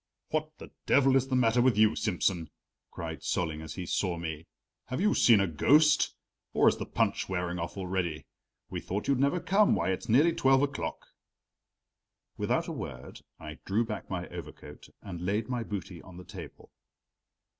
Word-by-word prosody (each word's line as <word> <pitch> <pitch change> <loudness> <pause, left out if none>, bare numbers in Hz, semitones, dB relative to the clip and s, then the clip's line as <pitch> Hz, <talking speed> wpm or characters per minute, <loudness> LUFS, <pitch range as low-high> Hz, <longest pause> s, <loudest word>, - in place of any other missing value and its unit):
"What 155 0 -2
the - - -11 0.2
devil 135 -1 +4
is 135 0 +3
the 130 - 0
matter 120 -1 +3
with 125 -3 +3
you, 110 0 +6
Simsen?" 90 -4 0 0.4
cried - - -6
Solling 80 -3 -2
as 80 -1 -8
he 90 - -5
saw 90 0 -1
me. 80 -1 -6 0.4
"Have 130 +2 -4
you 210 +3 +3
seen 115 -4 +6
a 100 - +3
ghost? 150 - +4 0.4
Or - - +4
is - - +4
the - - -5
punch - - 0
wearing 90 -1 -2
off 85 +4 -5
already? 90 -4 -2 0.4
We - - -5
thought 100 +3 -4
you'd 140 -2 +2
never 140 +6 +2
come; 200 +4 +3
why, - - 0
it's 95 +6 -4
nearly 150 +9 +5
twelve 135 -4 +3
o'clock!" 140 0 -3 1.3
Without - - 0
a - - -4
word 65 0 -7 0.2
I 75 +1 -9
drew 110 +4 +1
back 110 -1 -6
my 90 -2 -4
overcoat - - -10 0.2
and 90 -4 -7
laid 105 +5 -1
my 125 -2 -1
booty 95 -5 -6
on 90 -1 -13
the 90 - -10
table. - - -11
105 Hz, 175 wpm, -29 LUFS, 90-135 Hz, 1.3 s, you